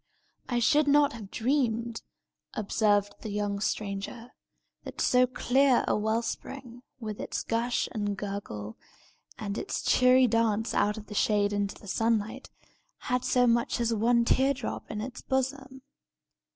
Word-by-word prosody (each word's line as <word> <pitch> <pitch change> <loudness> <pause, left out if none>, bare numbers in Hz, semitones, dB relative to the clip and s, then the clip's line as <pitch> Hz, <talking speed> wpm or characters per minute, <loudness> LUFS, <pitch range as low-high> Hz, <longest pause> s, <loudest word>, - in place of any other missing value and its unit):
"I 245 - 0
should 290 +5 +3
not 285 -1 +4
have 215 -4 -9
dreamed," 235 -2 0 0.5
observed 205 -1 +1
the 220 - -6
young 205 -1 -2
stranger, 210 +4 -4 0.5
"that - - -9
so 250 0 +4
clear 255 +1 +2
a - - +2
well 220 +2 0
spring, 245 0 -7 0.2
with 215 -3 -6
its - - -3
gush 235 +2 0
and 205 -2 -2
gurgle, 190 - -6 0.6
and 205 -1 -4
its 395 - -4
cheery 255 +1 +5
dance 225 -1 +1
out 210 +1 +1
of 215 - -8
the 210 - -9
shade 205 0 +2
into 200 -1 -2
the 205 - -14
sunlight, 225 +4 -1 0.6
had 250 0 +1
so 250 -1 +3
much 235 0 +1
as 235 -1 +1
one 235 +2 +3
tear 270 +3 +3
drop 250 -3 -6
in 210 -1 -4
its 250 +3 -6
bosom! 265 0 -3
230 Hz, 150 wpm, -28 LUFS, 210-250 Hz, 0.6 s, cheery